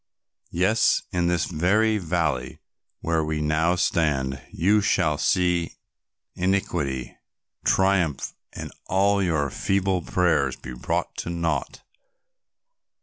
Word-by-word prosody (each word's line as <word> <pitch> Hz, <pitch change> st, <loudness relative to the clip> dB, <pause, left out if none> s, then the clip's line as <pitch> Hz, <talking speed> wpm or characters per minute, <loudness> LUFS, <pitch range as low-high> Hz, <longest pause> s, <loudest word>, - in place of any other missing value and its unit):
Yes, -, -, +2 dB
in 90 Hz, -1 st, +1 dB
this 85 Hz, -2 st, +1 dB
very 105 Hz, +6 st, +2 dB
valley 80 Hz, -7 st, -1 dB, 0.4 s
where 80 Hz, -1 st, 0 dB
we 75 Hz, 0 st, -2 dB
now 80 Hz, +3 st, +1 dB
stand, 70 Hz, -6 st, 0 dB
you 105 Hz, +5 st, +3 dB
shall 80 Hz, -7 st, +1 dB
see 90 Hz, -2 st, +1 dB, 0.6 s
iniquity 85 Hz, -9 st, -1 dB, 0.5 s
triumph 95 Hz, -6 st, +1 dB, 0.2 s
and -, -, -7 dB, 0.2 s
all 100 Hz, +1 st, +2 dB
your 80 Hz, -7 st, 0 dB
feeble 95 Hz, -2 st, 0 dB
prayers 80 Hz, -7 st, +1 dB
be 60 Hz, -, -9 dB
brought -, -, -2 dB
to -, -, -4 dB
naught. 85 Hz, -1 st, -2 dB
85 Hz, 105 wpm, -24 LUFS, 75-95 Hz, 0.6 s, you